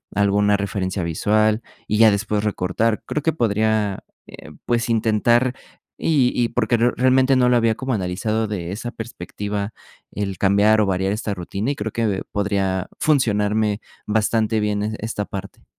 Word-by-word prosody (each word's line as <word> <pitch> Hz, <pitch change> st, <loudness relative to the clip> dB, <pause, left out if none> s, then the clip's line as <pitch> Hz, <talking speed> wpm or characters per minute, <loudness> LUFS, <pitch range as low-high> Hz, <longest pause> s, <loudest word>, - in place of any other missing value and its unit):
alguna 100 Hz, +1 st, +3 dB
referencia 95 Hz, -2 st, -2 dB
visual 105 Hz, +7 st, +1 dB, 0.3 s
y 105 Hz, -, 0 dB
ya 110 Hz, 0 st, +7 dB
después 105 Hz, +1 st, -1 dB
recortar. 105 Hz, +2 st, 0 dB
Creo 150 Hz, -, -2 dB
que 160 Hz, -, +1 dB
podría, 110 Hz, -4 st, 0 dB, 0.2 s
eh, -, -, -12 dB
pues, 120 Hz, 0 st, 0 dB
intentar 115 Hz, +3 st, +2 dB, 0.5 s
y 140 Hz, -6 st, +3 dB
y 120 Hz, -, +1 dB
porque 120 Hz, 0 st, +1 dB
realmente 130 Hz, +3 st, +3 dB
no 125 Hz, -1 st, +4 dB
lo 125 Hz, -, +4 dB
había 115 Hz, -1 st, +2 dB
como 130 Hz, +2 st, -3 dB
analizado 110 Hz, +3 st, -1 dB
de 90 Hz, -5 st, -4 dB
esa 120 Hz, +4 st, -5 dB
perspectiva, 105 Hz, -1 st, -5 dB, 0.4 s
el 100 Hz, -2 st, -3 dB
cambiar 100 Hz, +3 st, +4 dB
o 105 Hz, -, +3 dB
variar 95 Hz, 0 st, 0 dB
esta 105 Hz, 0 st, -2 dB
rutina, 100 Hz, +6 st, -3 dB
y -, -, -3 dB
creo 110 Hz, -1 st, -4 dB
que 105 Hz, -4 st, -1 dB
podría 95 Hz, -2 st, -1 dB
funcionarme 105 Hz, -6 st, +1 dB, 0.2 s
bastante 110 Hz, +1 st, +1 dB
bien 105 Hz, -1 st, 0 dB
e 110 Hz, +1 st, -2 dB
esta 110 Hz, -1 st, -3 dB
parte. 100 Hz, 0 st, -8 dB
105 Hz, 155 wpm, -21 LUFS, 100-115 Hz, 0.5 s, ya